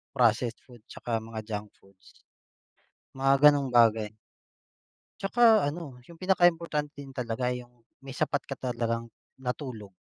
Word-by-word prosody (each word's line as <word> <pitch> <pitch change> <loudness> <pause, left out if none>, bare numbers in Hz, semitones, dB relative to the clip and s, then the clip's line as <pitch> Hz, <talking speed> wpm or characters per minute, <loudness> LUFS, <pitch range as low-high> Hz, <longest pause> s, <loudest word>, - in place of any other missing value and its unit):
processed 115 0 +2
food 120 -4 -16
tsaka 115 -2 -3
mga 110 -1 -6
junk 105 -1 -4
foods, 95 -1 -23 0.9
mga 135 +2 +6
gano'ng 140 -2 0
bagay. 110 -3 +4 1.1
Tsaka 220 -3 +4
ano, 145 -4 -5
yung 170 - -13
pinakaimportante 170 -4 +1
din 135 - -11
talaga 125 -1 -2
yung 125 -1 -8 0.2
may 135 -1 -10
sapat 145 0 -1
ka 135 - -4
talagang 115 -2 -3 0.2
na 130 -1 -4
tulog. 125 -7 -7
125 Hz, 130 wpm, -28 LUFS, 115-145 Hz, 1.1 s, mga